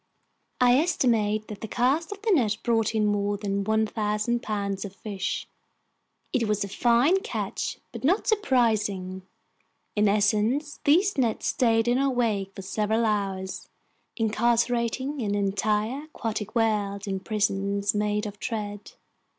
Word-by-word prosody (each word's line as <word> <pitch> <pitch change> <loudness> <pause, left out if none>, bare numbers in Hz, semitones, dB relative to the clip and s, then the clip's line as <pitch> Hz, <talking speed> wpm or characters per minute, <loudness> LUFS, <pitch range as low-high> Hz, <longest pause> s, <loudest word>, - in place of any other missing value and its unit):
I 250 +1 +5
estimate 225 -10 +1
that 210 -2 -8
this 220 - -6
cast 275 +8 +1
of 410 0 -8
the 445 - +2
net 225 - +3
brought 225 -2 +1
in 215 -1 +2
more 205 0 0
than 200 -1 -2
1,000 220 +2 0
pounds 200 -2 -2
of 195 -2 -8
fish. 200 -3 -4 0.9
It 240 -4 +1
was 210 -1 +1
a - - -4
fine 240 - +3
catch - - -3
but - - -8
not 360 +10 +2
surprising. 215 - +1 0.7
In 210 0 +3
essence, 215 +8 +1
these 350 +3 +3
nets 235 -4 0
stayed 225 -2 +2
in 245 +2 +3
our 275 0 +2
wake 215 -6 -1
for 195 - -7
several 215 +4 0
hours, 195 -3 -2 0.5
incarcerating 235 +4 +1
an 205 -2 -1
entire 210 +7 0
aquatic 225 -7 -5
world 205 -3 0
in 195 -1 -2
prisons 200 -1 0
made 210 0 0
of 205 -1 -6
thread. 205 -2 -5
215 Hz, 140 wpm, -26 LUFS, 205-245 Hz, 0.9 s, I